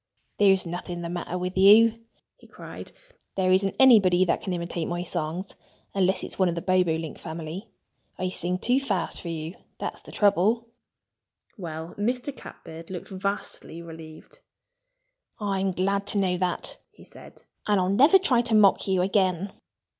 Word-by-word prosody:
"There's 195 -2 +4
nothing 175 0 -5
the 170 - -4
matter 175 0 -4
with 180 +1 -4
you!" 220 +4 +6 0.3
he - - -19
cried. - - -10 0.4
"There 185 -1 +2
isn't 195 +1 +2
anybody 195 -9 +6
that 170 - 0
can 190 - -4
imitate 170 -1 -3
my 175 0 -3
songs 175 +2 -4 0.4
unless 190 -1 +1
it's - - -8
one 185 -2 +4
of 170 - -2
the 170 - -3
Bobolink 170 -4 0
family. 165 +5 -7 0.5
I 185 0 -2
sing 180 0 -2
too 245 +7 +2
fast 215 -9 -2
for - - -8
you 160 0 -5 0.2
that's - - -5
the - - -13
trouble." 210 +3 +2 0.9
Well, 165 -3 -7
Mr. 250 +5 -2
Catbird 165 -7 -11
looked 185 0 -7
vastly 195 -3 -4
relieved. 160 -1 -12 1.0
"I'm 195 -2 -1
glad 200 +2 -1
to 205 - +3
know 185 -2 +1
that," 180 0 -1
he - - -18
said. - - -14 0.2
"And 205 -2 +3
I'll 185 0 +1
never 280 - +6
try 265 -11 +2
to 230 -2 0
mock 205 -2 +4
you 190 -2 +2
again." 190 -1 0
185 Hz, 160 wpm, -26 LUFS, 175-205 Hz, 1.0 s, you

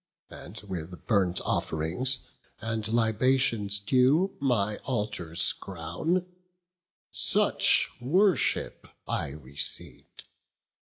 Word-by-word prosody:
And 105 +5 -9
with, 90 -3 -7
burnt 95 -5 +2
off'rings 90 +13 0 0.3
and 110 -1 -2
libations 115 -2 +2
due 130 - +2
My 110 -7 +1
altars 105 -9 -1
crown; 155 - -3 0.9
such - - +3
worship 185 +9 +1 0.2
I - - -1
receiv'd. 70 -1 -4
110 Hz, 75 wpm, -28 LUFS, 90-130 Hz, 0.9 s, such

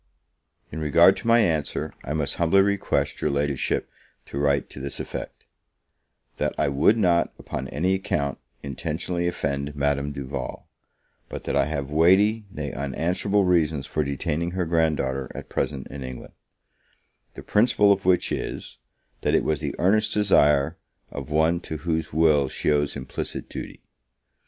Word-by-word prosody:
In 80 - -5
regard 85 +4 +5
to 115 - -6
my 115 0 +6
answer, 80 -8 -1
I 75 - -4
must 75 -2 -1
humbly 85 +3 +4
request 100 0 0
your - - +1
Ladyship 70 -1 0 0.4
to 70 - -5
write 70 -1 +1
to - - -9
this 70 +1 -5
effect: - - -7 0.9
"That - - -1
I - - +2
would 70 +11 +3
not, 90 -5 +2
upon 65 0 -5
any 85 +8 0
account, 70 -7 -1 0.2
intentionally 80 +5 -2
offend 70 -4 -2
Madame 70 0 0
Duval; 70 -2 -6 0.6
but - - -6
that - - -2
I - - +3
have 70 -3 -4
weighty, 100 +8 +4
nay 75 -6 -5
unanswerable 90 +9 0
reasons 80 -5 +2
for 75 - -1
detaining 80 +5 -2
her 90 - +1
grand 80 -2 +2
daughter 65 0 -2
at - - -8
present 65 -3 -2
in 70 -1 -7
England; 65 -1 -8 1.0
the - - -9
principal 105 -2 +4
of 95 0 -5
which 90 -1 +2
is, - - -4 0.4
that - - +2
it - - +3
was 75 -2 0
the - - -4
earnest 110 +4 +2
desire 80 -7 +3 0.3
of 70 -1 -7
one 80 +3 +2
to 80 -2 -6
whose 80 +1 -2
will 75 -3 +3
she 75 - -1
owes 75 -1 +1
implicit 65 - -5
duty. - - -8
75 Hz, 155 wpm, -25 LUFS, 70-90 Hz, 1.0 s, my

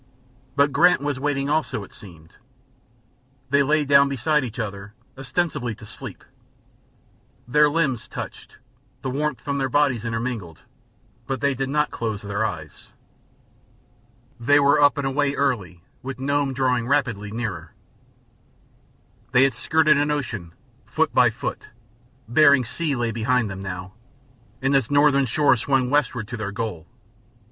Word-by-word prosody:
But 140 0 +3
Grant 165 +3 +4
was 145 -2 -2
waiting 140 -1 -1
also, 150 -8 -1
it - - -14
seemed. 85 -5 -14 1.2
They 140 0 +4
lay 150 +2 +2
down 140 0 +5
beside 140 +3 +1
each 115 -3 -6
other, 100 -1 -6 0.2
ostensibly 130 -3 -2
to 110 - -13
sleep; - - -10 1.2
their 150 +4 +4
limbs 145 -7 -1
touched; - - -8 0.5
the 130 - -2
warmth 145 0 -2
from 140 -1 -2
their 135 -1 0
bodies 135 -4 +2
intermingled, 115 -5 -4 0.7
but 135 -1 -2
they 140 -1 +1
did 135 +1 -3
not 150 +1 0
close 110 -3 -4
their 100 +1 -2
eyes. 80 -8 -6 1.5
They 145 +5 +4
were 145 +1 +4
up 145 +1 +5
and 140 - -2
away 140 +1 0
early, 100 -11 -1 0.2
with 130 0 -7
Nome 140 0 0
drawing 125 -3 +1
rapidly 120 -7 0
nearer. 110 -1 -5 1.6
They 125 +1 +6
had 135 - +3
skirted 155 -2 +3
an 145 +1 +1
ocean, 115 - -3 0.3
foot - - 0
by - - +5
foot; - - -6 0.6
Bering 140 +1 +5
Sea 155 +4 -2
lay 120 -2 -1
behind 115 -1 0
them, 95 0 -7
now, 95 -1 -6 0.7
and 135 +1 +2
its 135 -5 +2
northern 145 -2 +4
shore 145 +3 +3
swung 130 +1 0
westward 130 -7 0
to 120 - -5
their 105 -2 -4
goal. 100 -6 -5
130 Hz, 145 wpm, -23 LUFS, 110-145 Hz, 1.6 s, They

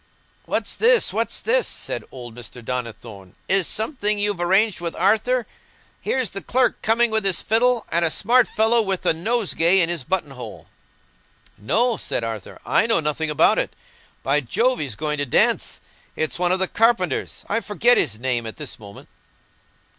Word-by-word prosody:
"What's - - -2
this, 480 +1 +3
what's - - -1
this?" - - +2
said - - -3
old 120 -3 -9
Mr. 120 0 -10
Donnithorne. 115 -6 -6
"Is 190 -2 +1
it - - -9
something 215 -3 -1
you've 205 -2 -1
arranged, 190 +2 +2
Arthur? 220 +6 +1 0.6
Here's 260 -4 -1
the 195 - -3
clerk 255 0 +1
coming 230 +1 +2
with 220 -1 +1
his 195 -2 +3
fiddle, 235 +1 +2
and 170 +1 +2
a 165 - +3
smart 235 +8 +3
fellow 225 +2 +2
with 195 -3 -3
a - - +4
nosegay 190 -1 +1
in 170 -2 +2
his 170 -5 -1
button 175 -1 -2
hole." 125 -2 -9 0.9
"No," 225 - 0
said - - -3
Arthur; 110 -4 -6
"I - - +2
know 225 -6 +3
nothing 155 0 -1
about 150 - +3
it. - - -3 0.5
By 145 +2 +2
Jove, 245 - 0
he's 135 -7 -4
going 150 +1 -3
to 145 - 0
dance! - - +1 0.4
It's 155 -1 -2
one 180 0 +2
of 185 - +3
the 190 0 0
carpenters—I 220 - 0
forget 230 +3 +2
his 110 - +1
name 120 -1 -2
at 110 - -8
this 150 -5 -7
moment." 100 -2 -13
185 Hz, 170 wpm, -22 LUFS, 135-225 Hz, 0.9 s, a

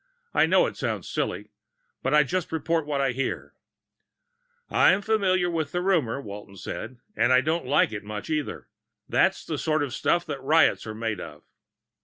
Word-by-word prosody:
"I - - +4
know - - +4
it - - -4
sounds - - -3
silly, - - -3 0.5
but - - -1
I 150 0 +6
just 180 +5 -2
report 160 0 -1
what 145 -2 -1
I 135 -2 +2
hear." 135 +2 -3 1.1
"I'm 195 +2 +4
familiar 190 -5 +2
with 160 -4 -2
the 180 - 0
rumor," 160 -11 +1
Walton 100 -4 -9
said. 120 +6 -6 0.2
"And 120 - +3
I 130 0 +6
don't 155 0 -1
like 135 -4 +3
it 105 -2 -5
much, 105 0 -6
either. 155 -3 -3 0.4
That's 190 +11 +2
the 155 -4 -3
sort 155 -2 +1
of 140 - -4
stuff 175 0 +1
riots 145 -2 +2
are 110 - -5
made 110 -3 -3
of." - - -10
150 Hz, 175 wpm, -26 LUFS, 125-170 Hz, 1.1 s, I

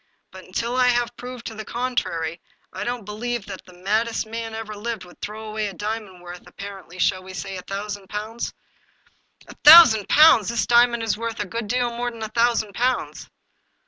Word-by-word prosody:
But, 190 0 -12
until 235 +6 -3
I 250 -1 +4
have 240 -1 +1
proved 250 -1 -9
the 220 - -6
contrary, 180 -10 -3 0.3
I 190 +1 -4
don't 240 -1 -4
believe 225 +1 -4
that 195 -2 -8
the 180 - -16
maddest 220 +4 0
man 225 0 -6
that - - -5
ever 220 -1 -6
lived 220 -1 -5
would 175 - -18
throw 215 +1 -6
away 215 0 -2
a 195 - -7
diamond 210 -3 -5
worth, 175 0 -10
ap - - -19
parently, 195 -3 -9
shall 185 +1 +1
we 185 0 -10
say 195 +2 -5
a 185 - -6
thousand 200 +1 -6
pounds? 215 +3 -4 0.3
" - - -37
" - - -29
A - - -11
thousand 295 - +9
pounds! 290 -9 +6
This 235 -1 0
diamond 235 -1 +4
is 225 -1 -1
worth 230 0 -4
a 205 - -1
good 230 +3 -5
deal 245 +1 0
more 245 +1 -2
than 230 -2 -8
a 215 - -4
thousand 230 -2 +1
pounds." 250 +4 -2
220 Hz, 210 wpm, -23 LUFS, 200-235 Hz, 0.3 s, thousand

